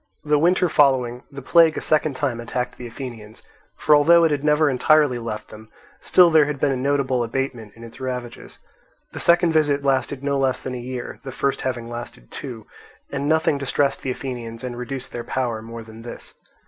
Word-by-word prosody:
The 150 -1 +2
winter 180 +3 +3
following, 130 -5 +2
the 135 -1 -9
plague 165 +1 +5
a - - 0
second 155 -2 +1
time 130 -3 -2
attacked 125 +1 -3
the 125 - -6
Athenians; 115 -3 -9 0.3
for 150 - +4
although 170 +3 +6
it 165 - +3
had 145 -1 -1
never 150 +1 +3
entirely 140 -1 +3
left 115 -2 -6
them, 110 0 -13 0.3
still 180 -2 +5
there 155 -2 +6
had 145 -1 -4
been 140 - +2
a - - 0
notable 130 -1 0
abatement 120 -3 -4
in 115 - -13
its 115 +3 -12
ravages. 125 -2 -6 0.5
The - - -7
second 170 0 +4
visit 145 -3 +2
lasted 135 0 0
no 140 -1 0
less 130 -1 +1
than 130 - -6
a 125 - -4
year, 125 0 -6
the 135 - -6
first 140 +2 -1
having 120 -3 -3
lasted 120 - -8
two; 115 -6 -7 0.5
and 140 +1 -2
nothing 160 -2 +2
distressed 140 0 0
the 135 - -4
Athenians 120 -3 -6
and 125 -1 -4
reduced 125 +2 -6
their 120 - -5
power 120 -2 -2
more 115 +1 -8
than 110 0 -12
this. 120 - -8
130 Hz, 200 wpm, -22 LUFS, 120-145 Hz, 0.5 s, although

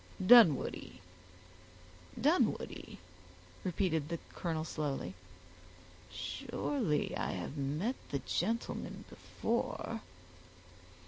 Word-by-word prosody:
"Dunwoodie, 220 - +6 1.2
Dunwoodie!" - - +1 0.7
repeated 160 -4 0
the 170 - -1 0.2
colonel 160 -2 -2
slowly, 140 - -3 1.0
"surely 145 +1 -1
I - - -1
have 95 +9 -4
met 150 - -1
the 140 - 0
gentleman 205 - -2
before." - - -2
155 Hz, 70 wpm, -34 LUFS, 140-180 Hz, 1.2 s, Dunwoodie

